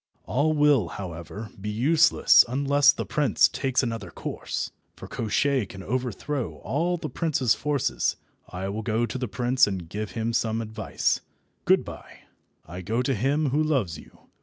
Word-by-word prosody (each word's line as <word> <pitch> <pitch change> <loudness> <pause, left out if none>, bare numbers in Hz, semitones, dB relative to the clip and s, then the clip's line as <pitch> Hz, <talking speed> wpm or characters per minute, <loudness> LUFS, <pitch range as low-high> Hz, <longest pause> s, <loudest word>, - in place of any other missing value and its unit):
All 150 +4 +1
will, 145 - +4
however, 95 +3 -7
be 105 - -3
useless 135 +10 +5
unless 140 +2 +4
the - - -5
prince 150 -3 +3
takes 135 -1 0
another 115 -6 -4
course, - - -5 0.2
for - - -10
Koshchei 125 +1 0
can 95 -1 -9
overthrow 125 +3 -3
all 175 +5 0
the - - -5
prince's 140 -8 +1
forces. 145 -3 0 0.3
I 95 +1 -5
will 105 +3 -3
go 115 +1 0
to 115 +2 -5
the 125 - -2
prince 125 +4 +2
and 95 -4 -4
give 105 +2 -5
him 115 +2 -2
some 115 -1 0
advice. 110 -1 -1 0.4
Good - - +4
bye. - - -11 0.4
I 90 +4 -8
go 115 +7 -1
to 135 - 0
him 140 +6 +1
who 150 +3 +2
loves 125 - 0
you. - - -17
120 Hz, 160 wpm, -26 LUFS, 105-140 Hz, 0.4 s, useless